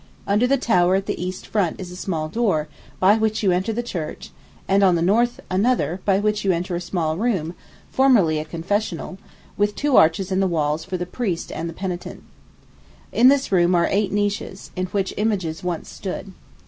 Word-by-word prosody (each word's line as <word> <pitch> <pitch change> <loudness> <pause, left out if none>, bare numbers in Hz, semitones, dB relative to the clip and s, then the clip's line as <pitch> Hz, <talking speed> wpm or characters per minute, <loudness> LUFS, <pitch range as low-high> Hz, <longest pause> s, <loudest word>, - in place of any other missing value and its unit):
Under 210 +5 +2
the 275 +2 +3
tower 185 -7 +3
at 195 0 0
the 175 - -3
east 185 0 -5
front 200 -6 -1
is 180 -2 -7
a - - -8
small 165 -4 -3
door, 175 -6 0 0.3
by 200 +4 +5
which 220 0 0
you 190 - +4
enter 185 +5 0
the 235 +2 -2
church, 170 -9 -6 0.4
and 195 +1 +3
on 185 -3 +5
the 165 - 0
north 235 +6 +2
another, 190 - 0
by 195 -2 +3
which 210 +1 0
you 195 - +3
enter 175 +1 -2
a 175 - -3
small 165 -3 -2
room, 190 -7 -1 0.4
formerly 220 - +4
a 155 - -4
confessional, 185 +2 -3 0.4
with 205 0 +1
two 290 -3 +2
arches 165 +4 +4
in 190 - +1
the 195 - +2
walls 155 -2 0
for 185 +2 -4
the 180 - -3
priest 180 -2 -3
and 165 +1 -4
the - - -7
penitent. 180 -1 -5 0.9
In 245 - +5
this 275 -2 +3
room 180 -1 +4
are 170 0 +3
eight 200 0 +1
niches, 205 -1 -2
in 185 0 -2
which 195 0 -2
images 190 -7 -1
once 175 -2 -3
stood. 195 0 -6
190 Hz, 200 wpm, -22 LUFS, 175-210 Hz, 0.9 s, by